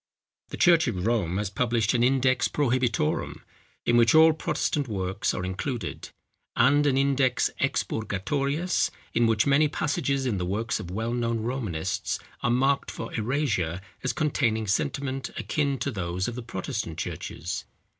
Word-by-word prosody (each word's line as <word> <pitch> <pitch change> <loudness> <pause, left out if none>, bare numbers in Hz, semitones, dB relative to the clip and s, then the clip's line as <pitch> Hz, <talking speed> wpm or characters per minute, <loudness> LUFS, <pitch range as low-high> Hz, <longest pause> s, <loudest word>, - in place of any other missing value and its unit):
The - - -6
church 170 -3 +5
of 95 -6 -2
Rome 100 -7 +1
has 100 -1 -2
published 115 0 +1
an 120 - +2
Index 130 0 +3
Prohibitorum, 125 - 0 0.4
in 120 - +4
which 120 +4 +5
all 160 0 +8
Protestant 150 -2 -1
works 95 -2 -1
are 90 - -3
included; 100 +2 -4 0.5
and 145 +2 +4
an 135 -2 +2
Index 135 -2 +2
Expurgatorius, 140 - 0 0.2
in 115 0 +3
which 110 -1 +2
many 140 +2 +4
passages 140 -2 -1
in 110 -7 0
the 90 - -1
works 110 +5 -1
of 85 - -7
well 110 +5 -2
known 115 -2 -1
Romanists 100 -8 -2 0.2
are - - +1
marked 135 +3 +2
for - - -6
erasure 110 - 0 0.2
as - - +1
containing 125 -9 0
sentiments 135 +5 -1
akin 140 -3 0
to 135 +4 -2
those 90 -3 -2
of 120 - -3
the 125 - -5
Protestant 110 - -4
churches. 90 +5 -4
120 Hz, 150 wpm, -26 LUFS, 105-140 Hz, 0.5 s, all